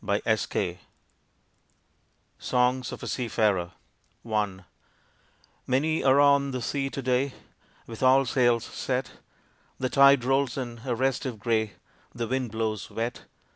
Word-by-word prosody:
_ 100 -3 -1 1.6
SONGS 125 0 +1
OF - - -8
A - - -5
SEA 125 -2 -2
FARER 95 -6 +1 0.6
I 105 -4 -1 1.1
Many 155 +5 +1
are 135 +1 +5
on 140 -1 +4
the 130 -2 -4
sea 135 +1 -1
to 135 - -6
day 130 +2 +1 0.5
With 115 -1 -9
all 130 +1 +5
sails 120 -2 +2
set. 130 0 -3 0.7
The 130 - -1
tide 140 -1 +6
rolls 135 0 +1
in 120 -3 -5
a 125 -3 -1
restive 130 -1 -1
gray, 110 -1 0 0.4
The 115 -1 -3
wind 130 -1 -1
blows 110 -4 -3
wet. 115 +2 -4
125 Hz, 130 wpm, -27 LUFS, 110-135 Hz, 1.6 s, tide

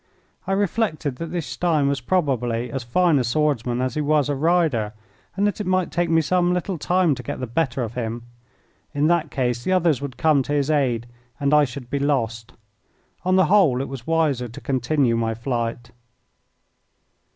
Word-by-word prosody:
I 195 - 0
reflected 185 - -1
that 165 - -5
this 170 -2 -3
Stein 160 -5 0
was 140 -2 -1
probably 125 -7 0
as 135 - -3
fine 155 +5 +2
a - - +1
swordsman 125 -2 0
as 130 -2 -1
he 150 - -1
was 150 -1 +2
a 145 - 0
rider, 150 -9 +1 0.4
and 200 +2 +1
that 205 0 -1
it 205 - -4
might 185 -1 +1
take 175 -1 0
me 165 0 +4
some 180 +2 +1
little 180 -1 -3
time 180 -1 +2
to 125 - -6
get 125 - -5
the 130 - -2
better 125 +1 -1
of 115 -1 -5
him. 115 -1 -4 0.7
In 145 +1 +2
that 165 -1 +2
case 125 -3 -1
the 185 - 0
others 165 -7 +2
would 135 -4 -6
come 155 -3 +3
to 145 +3 -3
his 145 +1 +1
aid 125 -6 +1 0.3
and 140 0 +1
I 150 -1 +6
should 125 -2 -9
be 140 - 0
lost. 115 -5 -1 0.7
On 185 +1 +2
the 185 -1 +5
whole, 170 -9 +4
it 135 - -3
was 135 -3 -8
wiser 155 -7 +1
to 115 - -10
continue 130 -1 +1
my 115 -1 -1
flight. 120 0 -3
140 Hz, 195 wpm, -22 LUFS, 125-165 Hz, 0.7 s, I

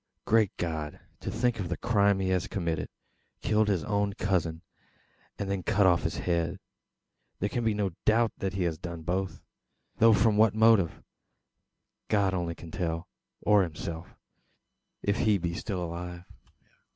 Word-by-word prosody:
"Great 110 -3 +4
God, 80 -3 -3 0.2
to - - -4
think 120 0 0
of 90 -4 -3
the 90 - -2
crime 100 -4 +3
he 95 -1 0
has 90 -1 +1
committed! 85 -4 -2 0.5
Killed 110 -1 +3
his 95 -6 +1
own 100 +3 0
cousin, 90 -4 -1 0.7
and 100 - -3
then 100 -1 -1
cut 100 +3 +2
off 90 -2 +4
his - - -2
head! 85 +1 -1 0.8
There 100 - -1
can 120 - -2
be 110 -2 +1
no 100 -2 0
doubt 115 +1 +3
that 95 0 -2
he 95 -1 -1
has 80 -3 -1
done 85 -2 -6
both; 95 +3 -2 0.5
though 115 0 +6
from 105 0 +3
what 110 -1 +5
motive, 110 -6 +4 1.0
God 100 -2 +2
only 85 -2 -2
can 85 -1 -11
tell, 85 -1 -2 0.3
or 105 -1 +5
himself, 80 -1 -5 0.9
if 100 +1 +1
he 105 -2 +3
be 85 -2 -2
still 90 0 -3
alive. 90 +1 -6
95 Hz, 160 wpm, -29 LUFS, 85-105 Hz, 1.0 s, though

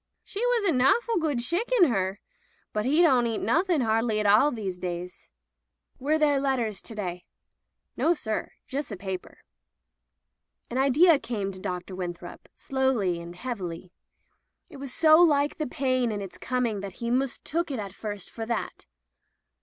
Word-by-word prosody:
"She 400 - -6
was - - +2
a 390 - +3
nawful 350 - +3
good 290 -7 0
shicken, 375 - +3
her. 195 -3 -1 0.5
But 215 +2 -1
'e 305 +6 +4
don't 255 -7 +4
eat 225 -2 -1
nothing 330 - +2
hardly 225 -1 +1
at 210 - -1
all 210 +8 +6
these 195 -6 -4
days." 180 0 -6 0.7
"Were 300 +4 +1
there 295 -3 +3
letters 250 -7 -1
to 225 - -7
day?'* 180 -4 -5 0.7
"Nossir; 295 -10 0 0.2
jus' 280 -1 -4
a 200 - -5
paper." 190 -1 -6 1.3
An 250 - -1
idea 290 +4 +5
came 205 -7 -3
to 185 - -10
Dr. 180 0 -5
Winthrop 175 -1 -7
slowly 245 -10 0
and 170 +1 -9
heavily. 180 -6 -5 0.8
It 290 - -10
was 275 -1 -7
so 315 +2 +6
like 290 -4 +3
the 310 - -2
pain 255 -2 0
in 205 - -3
its 195 -2 -8
coming 245 -4 -1
that 195 -1 -6
he 235 +4 -4
mistook 275 +6 -1
it 270 - -3
at 200 -3 -5
first 205 -2 -6
for 225 -1 -6
that. 235 - -3
240 Hz, 160 wpm, -27 LUFS, 200-285 Hz, 1.3 s, all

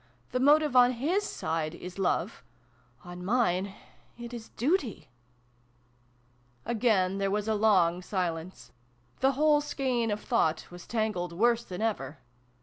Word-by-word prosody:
The 250 - 0
motive 295 +1 +4
on 250 0 +6
his 310 - 0
side 160 - -3
is 180 +2 -9
Love: 180 - -1 0.6
on 175 0 -8
mine 195 -3 +1 0.4
it 240 0 -8
is 230 -2 -8
Duty! 270 - -1 0.8
" 120 0 -37
Again 210 -5 +1
there 195 0 0
was 210 +1 -1
a 220 - +2
long 185 -5 +3
silence. 180 -2 -4 0.5
The 270 +1 +3
whole 295 +2 +3
skein 255 -5 -1
of 210 0 -1
thought 160 -12 0
was 175 0 -11
tangled 215 -6 -2
worse 235 +5 +2
than 185 +1 -6
ever. 155 -10 -2
205 Hz, 140 wpm, -29 LUFS, 175-240 Hz, 0.8 s, on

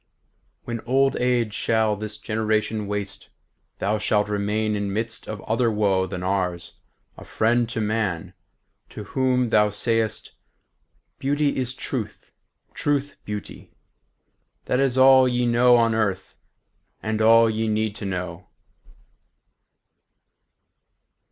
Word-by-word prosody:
··· - - -45 0.6
When 120 -1 -4
old 135 +2 +3
age 120 -3 +1
shall 110 -1 +1
this 105 0 -6
generation 110 0 -1
waste, 100 -1 -4 0.5
Thou 105 +2 -1
shalt 105 0 +1
remain, 105 +1 -1
in 100 -1 -2
midst 115 +3 -4
of 105 -2 -6
other 115 +1 +1
woe 100 -3 +1
Than 90 0 -5
ours, 90 -2 -2 0.4
a - - -10
friend 115 +1 +1
to 115 - -3
man, 105 -6 -2 0.6
to 105 - -8
whom 125 +2 0
thou 105 -1 +4
say'st, 110 +1 -1 0.9
'Beauty 145 +1 0
is 130 0 -2
truth, 125 -5 -5 0.4
truth 145 -1 -1
beauty'—that 105 +4 -8
is 135 -2 +1
all 130 0 +7
Ye 125 0 0
know 120 +1 +5
on 115 -1 +3
earth, 100 -4 -2 0.7
and 110 0 -1
all 115 +1 +6
ye 110 0 -1
need 110 -1 -1
to 100 - -6
know." 90 -2 -5
110 Hz, 120 wpm, -23 LUFS, 105-120 Hz, 0.9 s, all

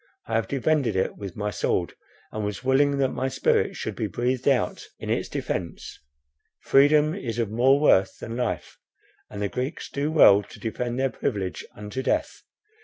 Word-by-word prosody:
I 115 - -6
have 115 0 +1
defended 140 -4 +1
it 95 - 0
with 100 -3 -8
my 105 0 -2
sword, 85 -1 -1 0.4
and 110 - -4
was 105 +4 -4
willing 140 +2 +3
that 135 -1 +2
my 130 - -2
spirit 130 - +1
should - - -4
be - - -2
breathed 125 +2 -2
out 135 -5 +1
in - - -5
its - - -1
defence; 85 -4 -4 0.6
freedom 150 +3 +4
is 120 - -4
of 115 -3 -1
more 130 +5 +4
worth 95 -10 +3
than 115 - -6
life, 125 -2 -3 0.5
and 105 0 -5
the - - +1
Greeks 130 - -4
do 145 +2 -1
well 105 -10 +7
to 100 - -14
defend 120 +2 -3
their 135 0 +1
privilege 95 -4 -3
unto 105 +5 -5
death. - - -1
120 Hz, 180 wpm, -25 LUFS, 105-135 Hz, 0.6 s, well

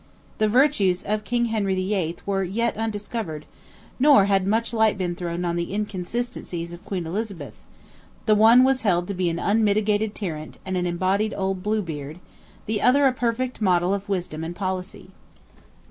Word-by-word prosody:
The 215 - +3
virtues 210 -7 +3
of 210 +1 -1
King 240 +3 0
Henry 200 -3 0
VIII. 185 -3 -1
were 195 -1 0
yet 215 +6 -1
undiscovered, 210 -7 -4 0.5
nor 275 -7 +6
had 195 -1 +2
much 225 +3 0
light 220 -2 +3
been 180 -2 -1
thrown 175 -1 -4
on 170 0 -1
the 170 0 -3
inconsistencies 195 -3 -4
of 175 - -11
Queen 185 -4 -4
Elizabeth; 175 - -4 0.7
the 215 - +4
one 225 +4 +7
was 265 0 +2
held 175 -4 +1
to - - -1
be 180 -2 0
an 165 - -2
unmitigated 210 +1 +1
tyrant, 155 -6 -6
and 190 0 -3
an 180 -1 0
embodied 190 +5 0 0.2
Blue 210 +3 -1
Beard; 150 -2 -6 0.5
the 215 -1 -1
other 280 +3 +4
a 265 - +4
perfect 245 0 -2
model 180 -1 +2
of 200 +1 -4
wisdom 175 -5 -3
and 170 +2 -5
policy. 185 -1 -5
200 Hz, 165 wpm, -24 LUFS, 175-220 Hz, 0.7 s, one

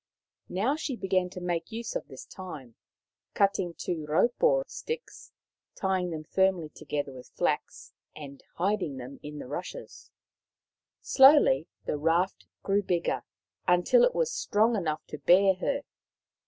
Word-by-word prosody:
Now 220 +10 +1
she 295 -4 -3
began 185 -4 0
to 180 - -8
make 175 +1 -3
use 230 +1 -5
of - - -3
this 130 - -10
time, 150 -10 -9 0.6
cutting 195 -4 +1
raupo 235 - +1
sticks, 470 0 -7 0.4
tying 190 -2 0
them 160 -2 -5
firmly 190 -2 +1
together 145 -2 -4
with 125 -1 -12
flax, - - -2 0.2
and 140 -2 -10
hiding 180 -6 -1
them 130 +2 -9
in 150 0 -8
the - - -7
rushes. 150 +8 -7 0.9
Slowly 265 - +6 0.2
the 150 - -2
raft 165 +5 +1 0.2
grew 200 +1 +2
bigger, 175 -3 -1 0.5
until 180 - +5
it - - +3
was 485 -1 +1
strong 220 +3 +2
enough 155 -6 -2
to 150 - -8
bear 190 +2 +5
her. 280 +8 -1
180 Hz, 135 wpm, -28 LUFS, 155-215 Hz, 0.9 s, Slowly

